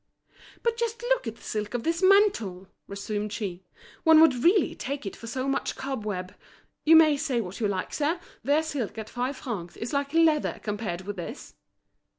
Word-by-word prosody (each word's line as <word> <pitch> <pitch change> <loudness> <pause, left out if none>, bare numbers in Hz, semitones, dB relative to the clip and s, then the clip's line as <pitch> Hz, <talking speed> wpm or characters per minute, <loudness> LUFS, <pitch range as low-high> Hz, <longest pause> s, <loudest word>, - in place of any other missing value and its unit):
"But 465 -1 +1
just 470 0 -2
look 485 - +1
at 225 - -4
the - - -19
silk 210 +1 -3
of 235 - -2
this 335 +1 0
mantle!" 375 - +3 0.2
resumed 205 +1 -4
she, 195 -4 -4 0.4
"one 320 -1 +7
would 275 -6 +5
really 360 0 +4
take 275 -2 -5
it 195 - -5
for 230 - -10
so 255 +3 -3
much 275 - -1
cobweb. 210 -9 -4 0.5
You 325 +1 +7
may 315 -2 +7
say 260 -3 0
what 190 -4 -5
you 215 - +1
like, 190 -2 -3
sir, 310 +4 0 0.2
their 290 +5 +3
silk 275 -9 -4
at 220 -1 -6
five 255 +3 -2
francs 195 -10 -6
is 235 +5 -5
like 280 0 0
leather 320 -2 +3
compared 205 -4 -3
with 200 +1 -6
this." 215 - -7
250 Hz, 185 wpm, -27 LUFS, 210-315 Hz, 0.5 s, one